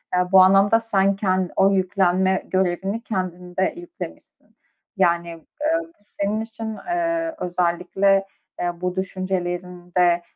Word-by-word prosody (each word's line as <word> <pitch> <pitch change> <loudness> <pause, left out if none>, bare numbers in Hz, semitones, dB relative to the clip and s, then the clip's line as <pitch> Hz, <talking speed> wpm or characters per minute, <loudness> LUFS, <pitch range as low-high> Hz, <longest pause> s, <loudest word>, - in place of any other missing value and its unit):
eee, 180 0 +1
bu 190 - +8
anlamda 195 +4 +5
sen 200 -3 +1
ken 185 -2 0
o 195 0 +5
yüklenme 190 0 +2
görevini 190 +3 -1
kendinde 185 -3 -2
yüklemişsin. 345 -1 -10 0.4
Yani, 170 -2 +2
eee, 300 - -2 0.2
bu - - -32
senin 205 +2 -2
için, 225 -1 -6
eee, 335 -1 -1
özellikle, 180 +2 +1 0.3
eee, 175 0 -3
bu 180 0 -2
düşüncelerinde, 180 -2 -1
190 Hz, 115 wpm, -22 LUFS, 180-200 Hz, 0.4 s, bu